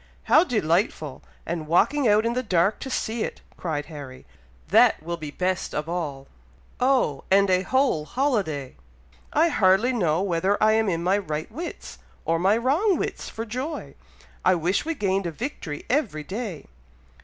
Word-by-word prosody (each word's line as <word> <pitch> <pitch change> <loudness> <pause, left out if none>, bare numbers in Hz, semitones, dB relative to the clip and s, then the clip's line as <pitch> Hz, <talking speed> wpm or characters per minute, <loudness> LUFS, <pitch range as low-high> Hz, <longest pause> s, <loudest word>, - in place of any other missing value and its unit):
"How 315 - +5
delightful! 170 - 0 0.2
and 165 -2 -4
walking 265 - +3
out 210 +1 +4
in 235 - +1
the 250 - 0
dark 195 -2 +1
to 270 - -6
see 230 -2 -2
it," - - -5
cried 150 -4 -3
Harry; 145 -5 -10 0.4
"that - - +5
will 170 +1 -3
be 155 -3 -7
best 185 +4 -2
of 150 +1 -2
all! 150 -6 -4 0.5
oh! 250 - +2
and 195 0 +4
a 185 0 +4
whole 255 - +1
holiday! 195 - -1 0.5
I 325 +3 +3
hardly 210 - +3
know 175 -6 +1
whether 190 +2 +1
I 215 0 +5
am 220 -1 +2
in 170 -2 -1
my 190 +3 +2
right 155 -3 -4
wits, 330 +9 -7 0.3
or 165 0 +1
my 195 +5 +3
wrong 315 - +2
wits, - - -4
for 225 - -5
joy! 255 +8 -5 0.5
I 185 - +4
wish 175 - 0
we 330 0 -2
gained 195 -5 0
a - - -3
victory 165 - -6
every 225 - 0
day!" 195 0 -5
190 Hz, 165 wpm, -25 LUFS, 165-240 Hz, 0.5 s, How